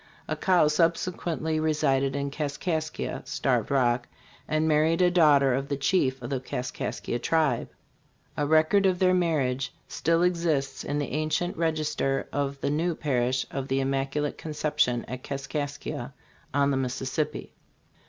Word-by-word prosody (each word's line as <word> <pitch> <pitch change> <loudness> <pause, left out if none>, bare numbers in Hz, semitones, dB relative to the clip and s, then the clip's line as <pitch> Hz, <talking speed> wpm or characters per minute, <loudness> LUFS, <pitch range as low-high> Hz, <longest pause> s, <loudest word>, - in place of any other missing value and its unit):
Accau 180 -5 +3
subsequently 165 0 0
resided 140 -4 +1
in 140 0 -2
Kaskaskia 155 +2 -3
[Starved - - 0
Rock] 125 -2 +2 0.4
and 155 +1 +1
married 155 +2 +3
a 180 -1 +4
daughter 145 -6 +5
of 135 +2 -1
the 140 -1 -2
chief 140 -2 +1
of 120 - -5
the 135 - 0
Kaskaskia 125 -2 -4
tribe. 150 -2 +1 0.7
A 145 - 0
record 160 +6 +4
of 185 -1 +2
their 185 0 +3
marriage 145 -8 +1 0.2
still 165 +1 +1
exists 165 -6 0
in 145 - -2
the 145 - -2
ancient 155 +4 -1
register 155 -4 0
of 140 -1 -2
the - - 0
[new] 165 +3 0
parish 130 -4 0
of 135 -1 -3
the 135 0 +1
Im 135 0 0
maculate 140 +2 -1
Conception 150 -5 0
at 130 +2 -6
Kaskaskia 140 -1 -4 0.4
[on 140 -1 +2
the 135 - +1
Mississppi]. 135 +4 -2
145 Hz, 145 wpm, -27 LUFS, 135-160 Hz, 0.7 s, daughter